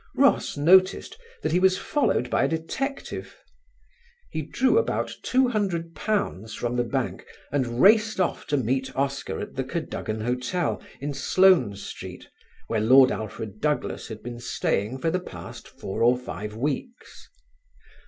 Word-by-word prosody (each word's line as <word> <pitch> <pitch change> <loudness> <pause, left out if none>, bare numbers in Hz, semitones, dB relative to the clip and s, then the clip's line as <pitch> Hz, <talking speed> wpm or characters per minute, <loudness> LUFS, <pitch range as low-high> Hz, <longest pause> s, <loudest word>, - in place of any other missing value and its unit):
Ross - - +3
noticed 185 +6 +4 0.3
that - - 0
he 180 - +3
was 185 0 +4
followed 180 - 0
by - - +3
a - - +2
detective. 165 - -4 0.9
He - - -2
drew 265 +11 +2
about 460 - -1
£200 200 - 0
from 120 0 -2
the 120 - +2
bank 115 - -2 0.3
and 125 -4 -1
raced 220 0 +5
off 180 - -1
to 145 - +1
meet 130 +1 -1
Oscar 135 0 -2
at - - -6
the 135 - -2
Cadogan 130 -7 -4
Hotel, 125 +9 -1 0.2
in 145 +1 -3
Sloane 140 - +4
Street, 100 - -8 0.4
where 110 -2 -1
Lord 130 +4 +7
Alfred 110 0 -5
Douglas 150 -1 -1
had 110 -2 -8
been 120 0 -6
staying 120 -1 -1
for 165 +5 0
the 180 - 0
past 180 - -10
four 95 - -6
or 120 +2 +5
five 105 -4 -6
weeks. 150 - -5
140 Hz, 145 wpm, -25 LUFS, 120-185 Hz, 0.9 s, Lord